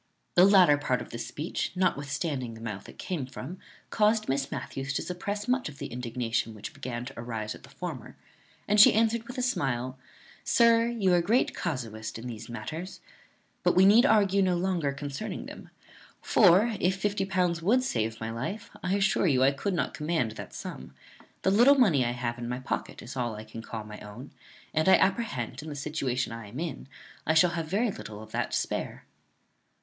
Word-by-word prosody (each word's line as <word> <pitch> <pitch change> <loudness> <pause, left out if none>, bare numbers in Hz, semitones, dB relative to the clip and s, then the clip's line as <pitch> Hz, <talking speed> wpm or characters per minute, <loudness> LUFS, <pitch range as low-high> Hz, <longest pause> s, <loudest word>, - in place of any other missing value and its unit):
The 180 - +7
latter 185 -7 +6
part 130 -4 0
of - - -9
this 115 0 -5
speech, 155 +4 -3
notwithstanding 145 -7 -1
the - - -11
mouth 105 -4 -6
it - - -13
came 155 -9 -3
from, 175 +7 -8 0.3
caused 215 0 +2
Miss 135 +1 -1
Matthews 140 0 -4
to - - -1
suppress 205 +4 -4
much 250 - +1
of 140 - -12
the - - -5
indignation 115 -2 -2
which 110 +7 -8
began 125 -4 -5
to 135 - -8
arise 115 -2 -4
at - - -13
the - - -15
former; - - -7 0.5
and 210 0 +6
she - - +8
answered 225 +1 +2
with 250 - -8
a 255 - 0
smile, 130 - -1 0.4
"Sir, 230 -1 +4
you 215 -6 +1
are - - +5
a - - +3
great 225 +9 +2
casuist 110 -9 -4
in 115 - -9
these 115 -2 -7
matters; 160 +9 -6 0.6
but - - +2
we 185 +1 +7
need 215 +5 +7
argue 200 -4 +4
no 185 -2 +2
longer 175 -5 0
concerning 145 +7 -5
them; - - -10 0.5
for, 210 +3 +5
if 185 +1 +2
fifty 200 0 -1
pounds 180 -3 0
would 235 +9 +3
save 110 - -1
my 110 0 -4
life, 130 - -5
I 185 +2 0
assure 195 -1 +2
you 130 -4 +3
I 135 - +5
could 180 +8 -2
not - - -1
command 150 -7 -1
that 110 - -8
sum. 65 +1 -8 0.5
The 190 - +3
little 240 +8 +7
money 175 - +4
I 120 0 0
have 120 -1 -3
in 120 0 -4
my 125 +1 -3
pocket 130 - -4
is 120 - -8
all 120 -4 -2
I 105 - -7
can 110 +1 -9
call 115 -1 -6
my 105 0 -9
own; 105 +7 -10 0.4
and 160 +3 +2
I - - +9
apprehend, 145 - 0
in 155 - -8
the 145 - -6
situation 135 -5 -2
I 115 -2 -8
am 120 +7 -8
in, 160 -6 -5 0.4
I 160 - +3
shall 170 +2 +5
have 165 -2 -3
very 210 +6 +1
little 105 - -8
of - - -14
that - - -1
to - - 0
spare." - - -3
150 Hz, 205 wpm, -28 LUFS, 120-195 Hz, 0.6 s, I